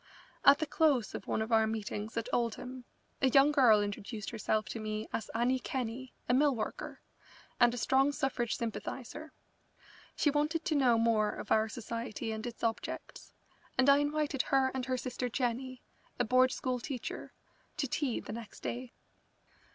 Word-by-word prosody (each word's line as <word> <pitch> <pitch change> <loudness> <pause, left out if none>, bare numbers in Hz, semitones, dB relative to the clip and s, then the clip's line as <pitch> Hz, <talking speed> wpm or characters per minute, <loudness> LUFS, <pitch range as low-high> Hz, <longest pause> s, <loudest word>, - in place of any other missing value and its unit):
At 280 0 +8
the 315 - -1
close 290 -7 +2
of - - -6
one 220 - 0
of 225 - -7
our 220 -1 +5
meetings 215 0 -4
at 230 - -1
Oldham 245 +2 -2 0.4
a 265 - +5
young 275 +3 +6
girl 235 -8 +6
introduced 205 +1 -5
herself 215 -1 0
to 230 - -4
me 215 0 -3
as 225 - -3
Annie 245 +3 +2
Kenney, 250 0 -4 0.2
a - - +2
mill 280 +1 +4
worker, 220 - -5 0.6
and 240 0 +6
a 245 - -5
strong 265 +4 +3
suffrage 255 -5 -1
sympathiser. 265 +6 -5 0.8
She 295 - +2
wanted 300 +3 0
to 350 - +1
know 255 -5 +4
more 225 -2 +3
of - - -7
our 220 0 +3
society 230 -1 -4
and 220 +2 -4
its 235 -1 -8
objects, 230 -1 -3 0.5
and 260 0 +4
I 280 - +6
invited 290 -1 0
her 265 -1 +2
and 260 -1 -3
her 255 -1 0
sister 250 0 -3
Jenny, 250 +1 -2 0.4
a 245 - +3
Board 255 +2 +4
School 255 -1 -2
teacher, 250 -1 -5 0.5
to 275 - 0
tea 260 -1 -1
the - - -7
next 230 -1 -9
day. 245 0 -5
245 Hz, 170 wpm, -32 LUFS, 225-270 Hz, 0.8 s, At